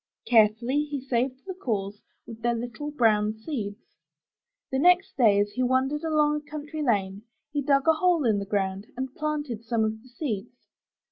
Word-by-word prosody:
Carefully 235 Hz, +5 st, +3 dB
he 290 Hz, -1 st, -4 dB
saved 260 Hz, 0 st, -2 dB
the 380 Hz, -, -5 dB
cores, 210 Hz, -, -3 dB, 0.2 s
with 230 Hz, -1 st, -10 dB
their 240 Hz, 0 st, +1 dB
little 245 Hz, +6 st, -5 dB
brown 215 Hz, -6 st, +2 dB
seeds. 220 Hz, -3 st, -5 dB, 0.9 s
The 265 Hz, -, 0 dB
next 360 Hz, +4 st, +4 dB
day, 215 Hz, -7 st, +5 dB
as 205 Hz, 0 st, +1 dB
he 255 Hz, -, -3 dB
wandered 260 Hz, +4 st, +1 dB
along 300 Hz, -2 st, +2 dB
a 300 Hz, 0 st, -10 dB
country 305 Hz, +1 st, -5 dB
lane, 200 Hz, -7 st, 0 dB, 0.3 s
he 290 Hz, -, -1 dB
dug 275 Hz, +1 st, +2 dB
a 320 Hz, -, +7 dB
hole 335 Hz, -2 st, +2 dB
in 215 Hz, -3 st, +3 dB
the 200 Hz, -, -4 dB
ground 195 Hz, 0 st, -1 dB
and 260 Hz, 0 st, -4 dB
planted 295 Hz, -7 st, -3 dB
some 230 Hz, -1 st, 0 dB
of 220 Hz, 0 st, -2 dB
the 255 Hz, -, -18 dB
seeds. 240 Hz, -3 st, -5 dB
250 Hz, 180 wpm, -26 LUFS, 215-295 Hz, 0.9 s, a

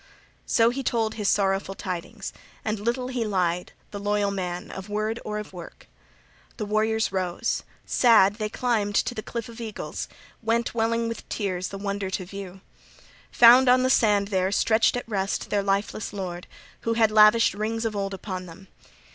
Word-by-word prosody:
So 230 Hz, -2 st, +4 dB
he 270 Hz, +2 st, -3 dB
told 225 Hz, -3 st, 0 dB
his 210 Hz, -2 st, -1 dB
sorrowful 195 Hz, -1 st, +1 dB
tidings, 180 Hz, -3 st, -5 dB, 0.3 s
and 215 Hz, -1 st, -1 dB
little 240 Hz, +4 st, -1 dB
{39d} -, -, -5 dB
he 245 Hz, -2 st, -1 dB
lied, 180 Hz, -4 st, 0 dB, 0.2 s
the 205 Hz, -, -5 dB
loyal 205 Hz, 0 st, 0 dB
man 180 Hz, -2 st, -4 dB
of 190 Hz, +1 st, -8 dB
word 215 Hz, +2 st, -1 dB
or 210 Hz, 0 st, -4 dB
of 210 Hz, -2 st, -7 dB
work. 175 Hz, -2 st, -11 dB, 0.7 s
The 215 Hz, -, -3 dB
warriors 220 Hz, +1 st, +1 dB
rose; 185 Hz, +3 st, -1 dB, 0.2 s
sad, 215 Hz, -5 st, +5 dB
they 215 Hz, -2 st, -2 dB
climbed 215 Hz, -4 st, 0 dB
to 245 Hz, -, +1 dB
the 215 Hz, -, -5 dB
Cliff 230 Hz, +1 st, -5 dB
of 235 Hz, 0 st, -10 dB
Eagles, 220 Hz, -2 st, -5 dB, 0.3 s
went, 230 Hz, +1 st, 0 dB
welling 230 Hz, 0 st, 0 dB
with 230 Hz, -, -6 dB
tears, 185 Hz, -4 st, -2 dB
the 195 Hz, -, -7 dB
wonder 200 Hz, -1 st, -3 dB
to 185 Hz, 0 st, -3 dB
view. 195 Hz, 0 st, -9 dB, 0.7 s
Found 245 Hz, +2 st, +8 dB
on 255 Hz, +1 st, +5 dB
the 260 Hz, -, +3 dB
sand 205 Hz, -5 st, +3 dB
there, 190 Hz, -1 st, +1 dB
stretched 220 Hz, +3 st, +3 dB
at 245 Hz, -, -5 dB
rest, 195 Hz, -3 st, -2 dB
their 205 Hz, -, +2 dB
lifeless 200 Hz, +2 st, -1 dB
lord, 180 Hz, -3 st, -5 dB, 0.3 s
who 230 Hz, -, -1 dB
had 225 Hz, -1 st, +3 dB
lavished 215 Hz, +1 st, +6 dB
rings 225 Hz, +3 st, -2 dB
of 220 Hz, -2 st, -2 dB
old 195 Hz, -1 st, -2 dB
upon 185 Hz, -2 st, -6 dB
them. 175 Hz, +3 st, -13 dB
210 Hz, 180 wpm, -25 LUFS, 195-230 Hz, 0.7 s, Found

